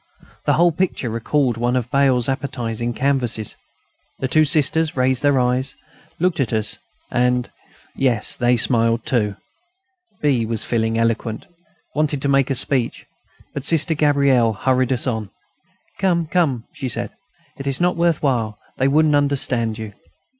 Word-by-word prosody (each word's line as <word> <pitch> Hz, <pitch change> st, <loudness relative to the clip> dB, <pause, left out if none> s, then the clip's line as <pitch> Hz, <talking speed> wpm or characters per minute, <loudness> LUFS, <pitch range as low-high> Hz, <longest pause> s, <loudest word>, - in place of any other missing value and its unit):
The -, -, +3 dB
whole 175 Hz, +1 st, +4 dB
picture 165 Hz, -8 st, -2 dB
recalled 120 Hz, +2 st, 0 dB
one 120 Hz, +2 st, 0 dB
of 125 Hz, -1 st, -2 dB
Bail's 130 Hz, -3 st, +3 dB
appetising 120 Hz, -4 st, -3 dB
canvases. 125 Hz, -5 st, 0 dB, 0.6 s
The 130 Hz, -, -2 dB
two 155 Hz, +4 st, +3 dB
Sisters 155 Hz, +1 st, +2 dB
raised 130 Hz, 0 st, +2 dB
their 145 Hz, -2 st, +3 dB
eyes, 125 Hz, +2 st, 0 dB, 0.4 s
looked 180 Hz, -1 st, +1 dB
at 130 Hz, -5 st, 0 dB
us 110 Hz, -2 st, +1 dB, 0.3 s
and 125 Hz, 0 st, +1 dB, 0.4 s
yes, 125 Hz, -5 st, +1 dB
they 120 Hz, 0 st, +2 dB
smiled 115 Hz, -1 st, +2 dB
too. 105 Hz, -5 st, 0 dB, 0.8 s
B., 135 Hz, -6 st, +2 dB
feeling 115 Hz, 0 st, 0 dB
eloquent, 115 Hz, -, -1 dB, 0.5 s
wanted 150 Hz, -1 st, 0 dB
to 140 Hz, -, +1 dB
make 140 Hz, -1 st, +3 dB
a 135 Hz, -, 0 dB
speech; 130 Hz, -1 st, 0 dB, 0.5 s
but 140 Hz, -, -5 dB
Sister 160 Hz, +2 st, +2 dB
Gabrielle 140 Hz, -6 st, +3 dB
hurried 130 Hz, +4 st, +1 dB
us 125 Hz, -2 st, 0 dB
on: 110 Hz, -5 st, -2 dB, 0.7 s
"Come, 175 Hz, -3 st, +1 dB
come," 150 Hz, -8 st, 0 dB
she 130 Hz, -, -4 dB
said. -, -, -2 dB, 0.5 s
"It 140 Hz, -, -5 dB
is 135 Hz, -1 st, 0 dB
not 180 Hz, +1 st, +2 dB
worth 170 Hz, -2 st, +1 dB
while; 115 Hz, -6 st, 0 dB, 0.2 s
they 135 Hz, -, +2 dB
wouldn't 150 Hz, +2 st, +3 dB
understand 130 Hz, -6 st, 0 dB
you." 110 Hz, -2 st, -7 dB
130 Hz, 145 wpm, -20 LUFS, 115-145 Hz, 0.8 s, whole